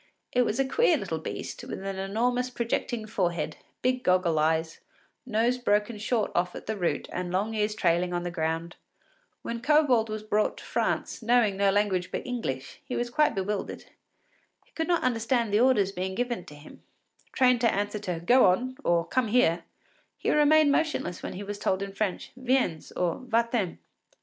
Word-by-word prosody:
It 250 - +3
was 230 - -1
a 270 - +3
queer 470 - +3
little - - -3
beast, - - -6
with - - -6
an 195 -1 -4
enormous 245 +6 0
projecting 235 -1 -2
forehead, 175 -7 -2 0.3
big 255 0 +1
goggle 180 -3 +2
eyes, 160 +1 0 0.5
nose 235 +2 +1
broken 210 -1 +1
short 220 +1 0
off 180 0 0
at - - -8
the 220 - -2
root, 180 -4 -1
and 180 -1 -3
long 200 +4 0
ears 210 -1 0
trailing 175 -1 +1
on 175 0 -2
the 175 - -3
ground. 165 +1 -2 0.7
When 235 0 -4
Kobold 270 -6 +3
was 215 0 -4
brought 215 0 0
to - - -10
France, - - -1
knowing 230 -3 +3
no 200 0 +3
language 195 -3 +1
but - - -4
English, 135 - -4
he - - -5
was 240 0 -2
quite 300 -3 +2
bewildered. 195 +1 -3 0.8
He - - -30
could 320 - -3
not 345 -1 +1
understand 235 -2 +1
the 210 - +4
orders 230 -6 +3
given 190 +3 -3
him; 150 0 -14 0.5
trained 250 -2 +3
to 235 - +4
answer 205 +1 -2
to 180 -5 -3
“Go 250 +1 +6
on,” 255 +8 +1
or 170 -1 +2
“Come 255 -3 0
here,” 180 -8 +2 0.5
he - - 0
remained 300 0 +5
motionless 305 - -1
when - - -5
he 195 - -6
was 205 0 -6
told 190 -1 0
in 195 0 -6
French, 200 -2 -2
“Viens,” 255 - 0
or 175 -2 -1
“Va 235 -2 +1
t’en. 205 -8 -1
210 Hz, 180 wpm, -27 LUFS, 180-245 Hz, 0.8 s, Go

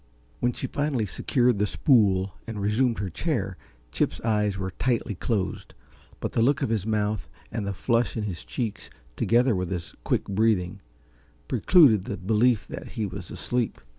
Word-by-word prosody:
When 120 - +2
she 125 - -5
finally 140 -4 -1
secured 120 - +1
the 105 - +2
spool 100 - +3
and 110 -2 -5
resumed 110 +4 +1
her 100 -2 -3
chair, 100 - -2 0.4
Chip's - - 0
eyes 105 -3 +1
were 95 -1 -3
tightly 120 +2 -1
closed, 100 0 -3 0.4
but - - -3
the - - +1
look 140 +4 +3
of - - 0
his 110 -3 -1
mouth 105 -1 -1 0.2
and 105 -3 -3
the - - 0
flush 115 +4 +1
in 110 - -1
his 95 -6 -4
cheeks, 115 -5 -4 0.3
together 120 0 +3
with 90 -1 -2
his 90 -3 -4
quick - - +1
breathing, 100 -3 +1 0.7
precluded 130 - +5
the 100 - -4
belief 110 +3 +2
that - - -8
he 110 -4 -1
was 95 -2 -7
asleep. 120 -2 -2
110 Hz, 165 wpm, -26 LUFS, 100-120 Hz, 0.7 s, precluded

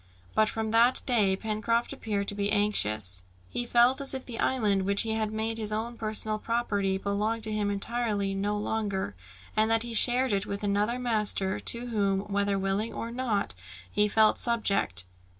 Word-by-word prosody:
But 215 0 +3
from 220 -1 -3
that 235 +3 +4
day, 210 -7 +3
Pencroft 220 +3 -1
appeared 200 -2 -3
to - - -1
be 205 0 -2
anxious. 110 - +1 0.3
He 240 - -3
felt 240 +3 +4
as 275 -1 +1
if 265 - -5
the 235 -2 -7
island 210 -7 +1
which 200 +1 +4
he 225 - -2
had 220 -1 -1
made 220 +1 -3
his 215 -1 -1
own 225 +3 -3
personal 215 -1 0
property 205 -5 -1
belonged 210 +3 -2
to 220 - -1
him 210 -1 -1
entirely 205 -1 -1
no 205 +2 -1
longer, 205 - -2 0.4
and 215 +1 +3
that 225 0 +2
he 235 -1 -6
shared 245 +2 +5
it 195 -1 -1
with 200 +1 -5
another 205 +4 0
master, 210 -5 0
to 235 +1 0
whom 200 -4 0
whether 200 0 -1
willing 195 +3 -1
or 230 - -5
not, 235 -5 -1 0.4
he 210 - +2
felt 215 +1 +3
subject. 200 - +1
215 Hz, 180 wpm, -28 LUFS, 200-230 Hz, 0.4 s, shared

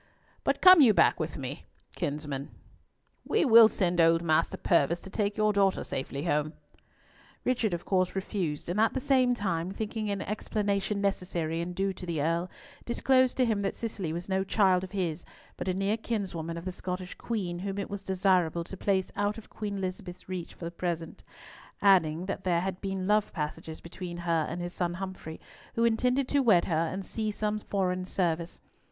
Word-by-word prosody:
But - - 0
come 370 -3 +10
you 225 -7 +6
back - - +4
with - - -3
me, - - -6 0.3
kinsman. 145 -4 -3 0.7
We - - +1
will 230 -3 +9
send 175 -5 +1
old 165 0 +4
Master 160 0 +2
Purvis 170 0 +2
to 190 - -11
take 205 0 -1
your 215 0 +3
daughter 195 -1 +2
safely 140 +1 -4
home." 150 -2 0 0.9
Richard 240 -4 +1
of 175 0 -4
course 185 -1 +1
refused, 185 -6 -3
and 175 +4 -1
at 225 - +3
the - - +1
same 255 -2 +3
time, 180 -5 -2
thinking 215 +1 -3
an 200 -1 -2
explanation 205 -1 -1
necessary 175 -4 -1
and 175 +1 -5
due 195 +1 0
to 180 -1 -9
the 165 -3 -2
Earl, 165 +4 0 0.3
disclosed 255 +1 +2
to 255 - +4
him 220 -3 0
that 195 - -2
Cicely 205 -8 -4
was 170 +2 -5
no 190 0 +1
child 190 -2 +3
of 185 - -7
his, 175 -4 -2 0.3
but 175 - -5
a 185 - +1
near 195 +3 0
kinswoman 180 -8 -3
of 170 - -7
the 185 - -2
Scottish 180 0 -5
Queen, 185 -7 -3
whom 195 +1 -4
it 200 - -3
was 200 -1 -4
desirable 185 -3 +1
to 185 - -9
place 190 0 0
out 205 +1 0
of 225 - -12
Queen 205 -2 -4
Elizabeth's 185 -1 -6
reach 185 -2 -5
for 170 - -8
the 170 - -4
present, 170 -2 -4 0.6
adding 180 -4 +4
that 195 0 -4
there 175 -2 +2
had 190 0 -4
been 195 -2 -3
love 210 +1 +2
passages 155 0 -5
between 175 0 -7
her 170 -2 0
and 175 +2 -4
his 175 0 -5
son 175 -1 -2
Humfrey, 185 -4 -7 0.4
who 230 - +1
intended 250 +3 +2
to 285 - +3
wed 215 -9 +4
her 170 - -2
and 190 +3 -5
see 220 -1 -2
some 210 0 -1
foreign 185 -3 -1
service. 170 -2 -1
190 Hz, 190 wpm, -29 LUFS, 170-205 Hz, 0.9 s, come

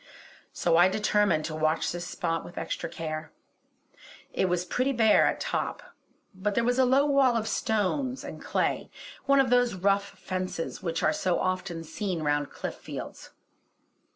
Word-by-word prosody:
So 165 -1 +2
I 175 +1 +7
determined 205 -5 +2
to 155 - -4
watch 155 +1 +1
this 175 0 -5
spot 165 -3 -2
with 175 - -12
extra 170 - -3
care. 155 -1 -5 1.0
It 185 - +1
was 180 0 0
pretty 255 +9 0
bare 220 -3 +5
at - - -1
top; - - -3 0.4
but 200 +2 -2
there 235 - +2
was 245 +2 +1
a 260 - +6
low 270 +3 +4
wall 275 -4 +4
of 220 -1 -2
stone 235 +5 0
and - - -8
clay, - - -1 0.4
one 275 0 +5
of 260 -3 +3
those 245 -3 +3
rough 200 +1 0
fences 185 -3 -4
which 165 -3 -2
are - - +3
so 185 - 0
often 185 -2 -2
seen 165 +1 -3
round 145 -1 0
cliff - - -5
fields. - - -8
190 Hz, 165 wpm, -28 LUFS, 165-235 Hz, 1.0 s, I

